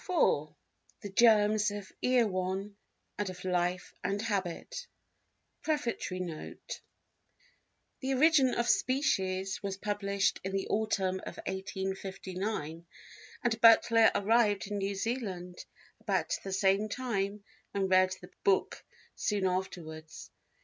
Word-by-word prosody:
III 365 Hz, -, +3 dB, 0.5 s
The 205 Hz, -, -7 dB
Germs 215 Hz, -2 st, +5 dB
of 205 Hz, -2 st, -7 dB
Erewhon 200 Hz, -5 st, +1 dB, 0.4 s
and 205 Hz, -2 st, -1 dB
of 180 Hz, 0 st, -8 dB
Life 180 Hz, 0 st, 0 dB
and 200 Hz, +1 st, -1 dB
Habit 205 Hz, -, -3 dB, 0.7 s
Prefatory 240 Hz, -11 st, -2 dB
Note 170 Hz, -4 st, -6 dB, 1.2 s
THE 265 Hz, 0 st, -1 dB
Origin 275 Hz, -2 st, +5 dB
of 235 Hz, -, 0 dB
Species 195 Hz, -, +1 dB
was 195 Hz, -1 st, -3 dB
published 200 Hz, -1 st, 0 dB
in 190 Hz, +1 st, -4 dB
the 195 Hz, 0 st, -1 dB
autumn 195 Hz, -3 st, 0 dB
of -, -, -8 dB
1859, 190 Hz, -3 st, -4 dB, 0.6 s
and 230 Hz, -2 st, 0 dB
Butler 230 Hz, 0 st, +7 dB
arrived 205 Hz, -1 st, +3 dB
in 205 Hz, 0 st, -3 dB
New 195 Hz, 0 st, -1 dB
Zealand 190 Hz, -5 st, -4 dB, 0.4 s
about -, -, 0 dB
the 195 Hz, -, -5 dB
same 195 Hz, +2 st, +2 dB
time 205 Hz, -4 st, -2 dB, 0.3 s
and 195 Hz, -1 st, 0 dB
read 185 Hz, 0 st, +4 dB
the -, -, -12 dB
book 400 Hz, 0 st, +1 dB, 0.3 s
soon 205 Hz, -2 st, 0 dB
afterwards. 175 Hz, -4 st, -4 dB
200 Hz, 115 wpm, -31 LUFS, 185-225 Hz, 1.2 s, Butler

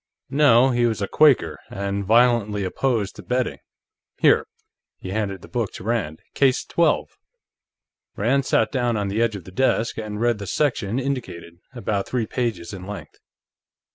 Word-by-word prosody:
"No. 135 Hz, -3 st, +5 dB
He 120 Hz, -1 st, +2 dB
was 110 Hz, -2 st, -2 dB
a 100 Hz, -, -1 dB
Quaker, 150 Hz, +2 st, +3 dB
and 100 Hz, 0 st, -3 dB
violently 110 Hz, -1 st, +3 dB
opposed 105 Hz, +1 st, -1 dB
to -, -, -8 dB
betting. 125 Hz, -1 st, -2 dB, 0.6 s
Here." -, -, +4 dB, 0.5 s
He 95 Hz, -, -8 dB
handed 100 Hz, -3 st, -3 dB
the -, -, -10 dB
book 120 Hz, -5 st, -2 dB
to -, -, -9 dB
Rand. 100 Hz, -9 st, -2 dB
"Case 135 Hz, -2 st, +2 dB
Twelve." 170 Hz, -, +1 dB, 1.1 s
Rand 125 Hz, +6 st, +1 dB
sat 110 Hz, -, +2 dB
down 120 Hz, -4 st, 0 dB
on 100 Hz, -1 st, -1 dB
the 105 Hz, +4 st, -1 dB
edge 115 Hz, -2 st, +1 dB
of 100 Hz, -, -7 dB
the 95 Hz, -, -12 dB
desk, 115 Hz, +1 st, 0 dB
and 105 Hz, -1 st, -5 dB
read 120 Hz, -2 st, +1 dB
the 100 Hz, -, -6 dB
section 120 Hz, -, 0 dB
indicated, 125 Hz, -11 st, -4 dB, 0.2 s
about 105 Hz, -5 st, -2 dB
three 125 Hz, -3 st, -1 dB
pages 115 Hz, -7 st, -3 dB
in 95 Hz, -1 st, -8 dB
length. 105 Hz, 0 st, -9 dB
115 Hz, 165 wpm, -23 LUFS, 100-125 Hz, 1.1 s, No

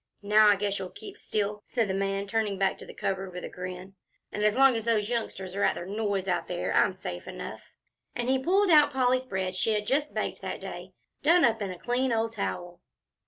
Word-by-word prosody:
"Now 210 Hz, +1 st, +6 dB
I 205 Hz, -, +6 dB
guess 200 Hz, 0 st, -1 dB
you'll 185 Hz, -1 st, -5 dB
keep 395 Hz, -, -10 dB
still," 210 Hz, 0 st, -2 dB
said 230 Hz, -3 st, 0 dB
the 190 Hz, -, -1 dB
man, 195 Hz, 0 st, -1 dB
turning 210 Hz, -1 st, -1 dB
back 190 Hz, 0 st, +1 dB
to -, -, -10 dB
the -, -, -9 dB
cupboard 190 Hz, -1 st, -2 dB
with 180 Hz, -, -6 dB
a -, -, -5 dB
grin; 185 Hz, +1 st, -7 dB, 0.4 s
"and 210 Hz, -, -3 dB
as 210 Hz, 0 st, +3 dB
long 270 Hz, -1 st, +6 dB
as 225 Hz, -1 st, -3 dB
those 220 Hz, -1 st, +1 dB
youngsters 195 Hz, -5 st, -3 dB
are 200 Hz, -, -2 dB
at -, -, +3 dB
their 175 Hz, -, -6 dB
noise 200 Hz, -1 st, -2 dB
out 180 Hz, -2 st, 0 dB
there, -, -, -2 dB
I'm -, -, +4 dB
safe -, -, -7 dB
enough," -, -, -8 dB, 0.5 s
and 240 Hz, 0 st, -2 dB
he 265 Hz, 0 st, +2 dB
pulled 385 Hz, +3 st, +3 dB
out 300 Hz, -2 st, +6 dB
Polly's 255 Hz, 0 st, +2 dB
bread 190 Hz, -3 st, -2 dB
she 215 Hz, +4 st, +1 dB
had 210 Hz, 0 st, -1 dB
just 290 Hz, +6 st, 0 dB
baked -, -, -2 dB
that -, -, -4 dB
day, -, -, -8 dB, 0.3 s
done 335 Hz, +1 st, +5 dB
up 225 Hz, -2 st, +1 dB
in 200 Hz, -, -2 dB
a 180 Hz, -, -6 dB
clean 250 Hz, +5 st, 0 dB
old 225 Hz, 0 st, 0 dB
towel. 175 Hz, -4 st, -4 dB
210 Hz, 230 wpm, -28 LUFS, 195-245 Hz, 0.5 s, Now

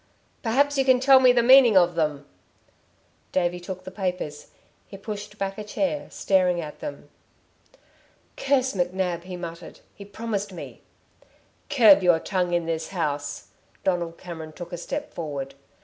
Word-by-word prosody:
"Perhaps 275 Hz, +5 st, +1 dB
you -, -, +4 dB
can 260 Hz, -1 st, +4 dB
tell 265 Hz, +1 st, +7 dB
me 255 Hz, -1 st, +6 dB
the 240 Hz, -1 st, +3 dB
meaning 250 Hz, -4 st, +7 dB
of 175 Hz, -1 st, +4 dB
them." 150 Hz, -4 st, -1 dB, 1.1 s
David 175 Hz, -1 st, 0 dB
took 185 Hz, 0 st, -7 dB
the 185 Hz, -, -8 dB
papers. 180 Hz, -6 st, -4 dB, 0.4 s
He 195 Hz, -, -10 dB
pushed 210 Hz, +1 st, -7 dB
back 195 Hz, 0 st, -3 dB
a -, -, -4 dB
chair, 285 Hz, +7 st, -2 dB
staring 180 Hz, -2 st, +1 dB
at 150 Hz, -3 st, -7 dB
them. 295 Hz, -, -7 dB, 1.3 s
"Curse 275 Hz, -, +1 dB
McNab!" 180 Hz, -1 st, -2 dB
he 180 Hz, -1 st, -7 dB
muttered. 170 Hz, -1 st, -9 dB
"He 200 Hz, -, -11 dB
promised 205 Hz, 0 st, -4 dB
me 180 Hz, -, -10 dB, 0.4 s
" -, -, -34 dB
"Curb 215 Hz, -8 st, +7 dB
your 175 Hz, -2 st, +4 dB
tongue 180 Hz, -1 st, -1 dB
in 170 Hz, -1 st, 0 dB
this 165 Hz, -1 st, -3 dB
house!" 145 Hz, -5 st, -4 dB, 0.3 s
Donald 170 Hz, -3 st, -1 dB
Cameron 160 Hz, -3 st, -8 dB
took 175 Hz, +2 st, -9 dB
a -, -, -3 dB
step 295 Hz, -, -5 dB
forward. 140 Hz, -5 st, -5 dB
185 Hz, 155 wpm, -25 LUFS, 170-225 Hz, 1.3 s, tell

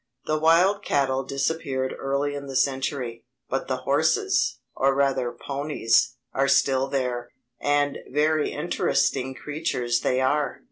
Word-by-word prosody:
The 155 Hz, 0 st, 0 dB
wild 170 Hz, +6 st, +4 dB
cattle 135 Hz, -2 st, +1 dB
disappeared 135 Hz, -1 st, -2 dB
early 140 Hz, +1 st, -1 dB
in 140 Hz, -1 st, -6 dB
the 135 Hz, -, -6 dB
century; 130 Hz, -3 st, -1 dB, 0.3 s
but 135 Hz, -, -1 dB
the 130 Hz, -, -1 dB
horses, 160 Hz, -, +2 dB, 0.2 s
or 135 Hz, 0 st, +2 dB
rather 135 Hz, -3 st, +1 dB
ponies, 125 Hz, -2 st, 0 dB, 0.2 s
are 135 Hz, +1 st, +2 dB
still 135 Hz, -1 st, +3 dB
there, 125 Hz, -3 st, -2 dB, 0.3 s
and 145 Hz, 0 st, +1 dB
very 150 Hz, +2 st, +2 dB
interesting 130 Hz, 0 st, 0 dB
creatures 125 Hz, -5 st, -1 dB
they 125 Hz, -, +1 dB
are. 145 Hz, +3 st, +1 dB
135 Hz, 130 wpm, -25 LUFS, 130-145 Hz, 0.3 s, wild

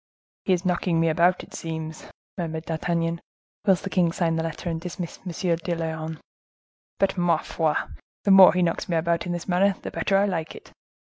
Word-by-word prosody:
"He 190 Hz, -, +3 dB
is 180 Hz, +1 st, -1 dB
knocking 175 Hz, -2 st, +1 dB
me 165 Hz, 0 st, +3 dB
about, 175 Hz, +3 st, +3 dB
it 195 Hz, -, -15 dB
seems," 160 Hz, -3 st, -6 dB, 0.3 s
murmured 160 Hz, -3 st, -4 dB
D'Artagnan, 165 Hz, 0 st, -1 dB, 0.5 s
whilst 190 Hz, -2 st, +4 dB
the 195 Hz, -, -3 dB
king 175 Hz, -3 st, +3 dB
signed 165 Hz, -1 st, 0 dB
the -, -, 0 dB
letter, 165 Hz, +2 st, -5 dB
and 165 Hz, -1 st, -2 dB
dismissed 175 Hz, -1 st, -6 dB
M. -, -, -2 dB, 0.3 s
de 170 Hz, +1 st, -3 dB
Lyonne; 160 Hz, -1 st, -4 dB, 0.8 s
"but 195 Hz, -1 st, +1 dB
ma 175 Hz, -2 st, +3 dB
foi! 155 Hz, -1 st, -1 dB, 0.5 s
the 200 Hz, -, +3 dB
more 195 Hz, -1 st, +10 dB
he 180 Hz, 0 st, +2 dB
knocks 170 Hz, +1 st, -1 dB
me 170 Hz, -, +1 dB
about 170 Hz, +1 st, 0 dB
in -, -, -2 dB
this 175 Hz, -1 st, -4 dB
manner, 190 Hz, +2 st, +3 dB
the -, -, -5 dB
better 195 Hz, -, +1 dB
I 200 Hz, -, +4 dB
like 165 Hz, -5 st, -3 dB
it." -, -, -13 dB
170 Hz, 200 wpm, -25 LUFS, 165-180 Hz, 0.8 s, more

